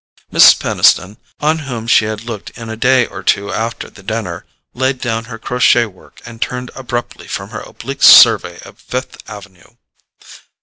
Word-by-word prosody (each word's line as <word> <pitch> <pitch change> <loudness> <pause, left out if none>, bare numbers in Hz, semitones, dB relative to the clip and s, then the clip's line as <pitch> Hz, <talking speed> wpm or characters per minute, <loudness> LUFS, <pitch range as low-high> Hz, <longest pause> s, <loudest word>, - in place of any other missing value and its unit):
Mrs. - - +7
Peniston, 95 +4 +2 0.2
on 155 +2 +1
whom 125 -6 -6
she 115 -2 +3
had 110 0 -5
looked 115 -4 -7
in 115 -2 -8
a 110 - -5
day 125 +2 +2
or - - -9
two 100 0 0
after 115 +1 -4
the 100 - -16
dinner, 100 -4 -5 0.3
laid 130 +1 -1
down 115 -2 -3
her 115 -1 -9
crochet 125 0 +2
work 95 -5 -17
and 115 -1 -12
turned 125 0 -4
abruptly 120 -2 -6
from - - -6
her - - -6
oblique - - -9
survey - - +7
of - - -15
Fifth 130 +1 -6
Avenue. 100 -4 -13
115 Hz, 170 wpm, -15 LUFS, 110-125 Hz, 0.3 s, Mrs